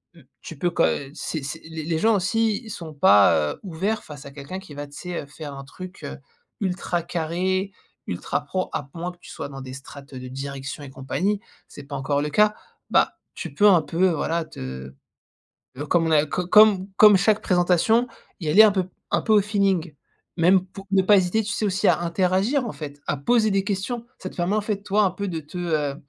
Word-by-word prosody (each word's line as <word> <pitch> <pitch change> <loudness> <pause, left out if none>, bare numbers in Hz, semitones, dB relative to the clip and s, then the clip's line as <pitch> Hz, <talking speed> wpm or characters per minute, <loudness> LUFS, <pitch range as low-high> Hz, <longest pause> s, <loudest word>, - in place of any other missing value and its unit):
Mmh, 165 - -16 0.2
tu 160 - -9
peux, 175 +5 +1
quand - - +3
heu, 140 -1 -2
c'est 155 0 -4
c'est 155 +4 -6
les 160 -1 -6
les 160 -1 -1
gens, 220 +4 +4
aussi, 215 +3 +1
ils - - -9
sont 165 -5 -7
pas, 100 - +5
heu, - - -15
ouverts 195 +4 -2
face 145 -2 -11
à 140 - -9
quelqu'un 145 +7 -7
qui 190 -6 -12
va, 145 0 -6
tu 145 - -19
sais, 180 -1 -4
heu, - - -10
faire 150 0 -8
un 135 0 -8
truc, 185 +7 -11
heu, - - -6 0.4
ultra 180 -2 -1
carré, 180 +4 -1 0.4
ultra - - -2
pro 185 -1 -3
à 140 -2 -4
moins 175 +1 -4
que 175 - -20
tu - - -13
sois - - -6
dans 135 -1 -8
des 130 -1 -8
strates, 140 +1 -11
heu, 130 - -6
de 125 - -8
direction 135 +2 -6
et 140 - -8
compagnie. 165 +10 -2 0.3
C'est - - -11
pas 140 +1 -7
encore 140 +2 0
le 150 - -2
cas. 210 +5 +4 0.3
Bah, - - +3 0.2
tu 165 - -6
peux 205 +9 +5
un 180 -4 +6
peu, 170 +5 +2
voilà, 165 0 -1
te, 65 - -8 0.8
heu, 145 - -4
comme 165 +1 +2
on - - 0
a 150 -1 +4
co 180 +3 -3
comme 205 -1 +6
comme 210 -1 +8
chaque 210 +3 +2
présentation, 180 +6 +3 0.3
y 155 - -2
aller 205 +8 +8
un 215 - +6
peu 185 -2 -1 0.2
un - - +2
peu 220 - -1
au 210 - +6
feeling. 195 -5 0 0.4
Même 185 +2 +4
pour 195 +1 -12
ne 195 -1 +5
pas 205 +2 +6
hésiter, 190 +4 +1
tu 210 - -4
sais, 220 - -1
aussi 200 +1 +1
à - - +3
interagir, 190 +9 +1
en 225 - -3
fait, 145 -2 -8
à 145 - 0
poser 220 - +2
des 195 0 +1
questions. 210 +5 -3
Ça 185 - -6
te - - -16
permet, 175 +3 0
en 215 - +1
fait, 205 -1 -3
toi, 205 +1 +2
un 190 - +2
peu 200 +2 -4
de 170 -3 -3
te, 150 +5 -10
heu, 155 -5 -1
175 Hz, 230 wpm, -24 LUFS, 145-200 Hz, 0.8 s, comme